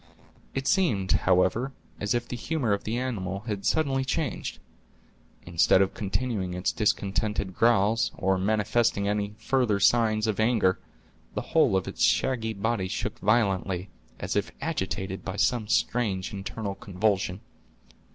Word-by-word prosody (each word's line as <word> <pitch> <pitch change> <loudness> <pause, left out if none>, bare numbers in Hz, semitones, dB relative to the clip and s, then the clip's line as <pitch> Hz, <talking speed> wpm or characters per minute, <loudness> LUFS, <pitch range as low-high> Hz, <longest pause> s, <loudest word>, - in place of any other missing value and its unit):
It 135 0 -2
seemed, 115 - +2
however, 95 +9 +2 0.3
as 105 +3 0
if 120 0 -2
the - - -5
humor 125 -3 -1
of 100 - -3
the 115 +2 -1
animal 100 -7 -3
had 105 -3 -3
suddenly 135 -4 +1
changed. 150 +3 -2 0.9
Instead 85 +2 +4
of 95 0 +2
continuing 100 -3 -2
its 90 - 0
discontented 100 -1 -1
growls, 115 +1 +3
or 95 0 +1
manifesting 105 +1 +1
any 105 0 -1
further 120 -6 +1
signs 110 0 +3
of 110 -2 -1
anger, 110 -5 +2 0.6
the - - -1
whole 95 - +4
of 95 - -2
its - - -6
shaggy 115 -4 +1
body 100 -1 -1
shook - - -4
violently, 95 -4 +1 0.3
as - - -3
if - - 0
agitated 95 0 -3
by 95 - -4
some 110 +1 +1
strange 105 -6 0
internal 100 +1 -4
convulsion. 95 -1 -1
105 Hz, 140 wpm, -27 LUFS, 95-120 Hz, 0.9 s, Instead